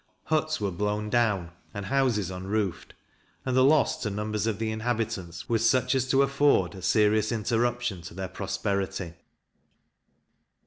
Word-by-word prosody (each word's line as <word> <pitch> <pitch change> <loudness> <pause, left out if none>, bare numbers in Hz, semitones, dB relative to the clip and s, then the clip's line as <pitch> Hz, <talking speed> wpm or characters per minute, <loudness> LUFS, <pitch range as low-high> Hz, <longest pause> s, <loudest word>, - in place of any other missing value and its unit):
Huts 155 0 0
were 100 -2 -1
blown 105 +3 -2
down 105 -8 +1 0.2
and 100 -1 -4
houses 120 -8 +1
unroofed, 95 0 -3 0.5
and 130 -1 0
the 130 - +5
loss 145 +1 +3
to 110 - -1
numbers 105 +1 -2
of 110 -3 -1
the 110 -1 -2
inhabitants 110 -6 -3
was 115 -1 +3
such 130 +2 +2
as 130 -1 +1
to 135 +1 +4
afford 140 -10 +2
a 95 - -9
serious 110 +2 +3
interruption 120 -2 0
to 85 - -10
their 95 0 -4
prosperity. 100 -2 -3
110 Hz, 145 wpm, -27 LUFS, 100-120 Hz, 0.5 s, the